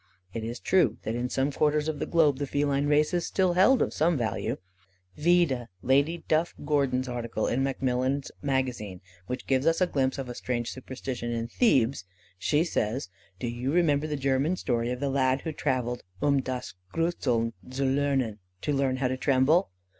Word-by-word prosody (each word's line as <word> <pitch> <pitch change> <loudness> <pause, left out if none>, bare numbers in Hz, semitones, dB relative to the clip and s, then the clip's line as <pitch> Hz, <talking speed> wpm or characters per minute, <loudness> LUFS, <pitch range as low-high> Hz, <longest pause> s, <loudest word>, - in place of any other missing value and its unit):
It 115 - -4
is 115 +2 -5
true, 185 -1 +2
that 110 - -2
in 120 +1 -2
some 135 +3 0
quarters 150 +1 +1
of 155 -2 -2
the - - -2
globe, 150 -5 +3
the 145 - -2
feline 145 0 +1
race 150 +2 +3
is 175 -1 0
still 185 -2 +2
held 205 +8 +5
of - - -3
some 160 +1 +2
value. 110 -5 -2 0.6
Vide 155 -7 +2 0.2
Lady 140 +6 +2
Duff 160 +2 +1
Gordon's 135 -3 +1
Article 120 -3 -2
in 125 - 0
Macmillan's 135 0 0
Magazine, 125 -9 -2 0.3
which 125 +1 -4
gives 135 +2 +1
us 165 0 +3
a 185 - +4
glimpse 135 -6 0
of 135 -2 -4
a 120 - -5
strange 120 -1 -3
superstition 130 -2 -5
in 115 0 -2
Thebes. 130 - +2 0.4
She 150 - +2
says: 120 - -1 0.3
"Do 120 - -4
you 120 +3 -2
remember 155 -3 +2
the 150 - -2
German 135 +5 +1
story 120 -7 -1
of 125 0 -3
the 140 - 0
lad 130 0 +2
who 160 - -3
travelled 125 -4 -1 0.2
'um 140 +2 +2
das 125 -1 -5 0.2
gruseln 125 - 0 0.2
zu 135 +1 -1
lernen' 135 -5 +1 0.2
(to 145 - -1
learn 135 -2 +1
how 130 0 0
to 130 +1 -2
tremble)? 140 +7 +3
135 Hz, 185 wpm, -28 LUFS, 125-150 Hz, 0.6 s, held